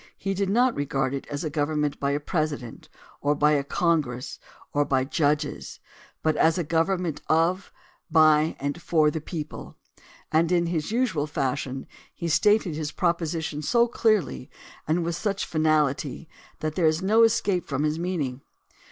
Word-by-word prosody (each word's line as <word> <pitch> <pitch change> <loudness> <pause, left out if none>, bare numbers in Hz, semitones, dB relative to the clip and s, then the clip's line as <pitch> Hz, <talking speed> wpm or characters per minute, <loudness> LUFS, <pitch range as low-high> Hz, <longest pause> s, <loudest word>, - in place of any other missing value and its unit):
He 195 - -2
did 195 0 -1
not 245 +4 +3
regard 135 -2 -1
it 140 - -5
as 145 +3 -4
a 155 - -3
government 150 -1 -1
by 140 - 0
a 145 +1 0
president, 150 -6 -3 0.3
or 145 +1 +2
by 150 +1 +3
a 145 -2 +2
congress, 140 -5 -1 0.3
or 145 - +3
by 135 -2 +1
judges, 145 +1 -1 0.4
but 155 -1 +2
as 165 +2 +3
a 175 - 0
government 165 0 0
of, 170 +4 +1 0.4
by 155 -1 +4
and 145 +4 -3
for 155 -3 +3
the 160 - -4
people, 155 -1 -7 0.5
and 160 +2 +2
in 170 -1 +3
his 165 +1 -2
usual 220 - 0
fashion 135 -2 -2 0.3
he 170 - -4
stated 205 +1 +3
his 150 -1 -3
proposition 165 -3 -1
so 235 +9 +3
clearly 215 - 0 0.4
and 165 +3 +1
with 170 0 -2
such 200 0 -2
finahty 155 -2 0 0.3
that 155 -1 -2
there 165 0 +2
is 155 +3 +1
no 215 +4 +4
escape 205 -5 +2
from 140 0 -1
his 155 +1 0
meaning. 150 -8 -2
155 Hz, 160 wpm, -25 LUFS, 145-175 Hz, 0.5 s, by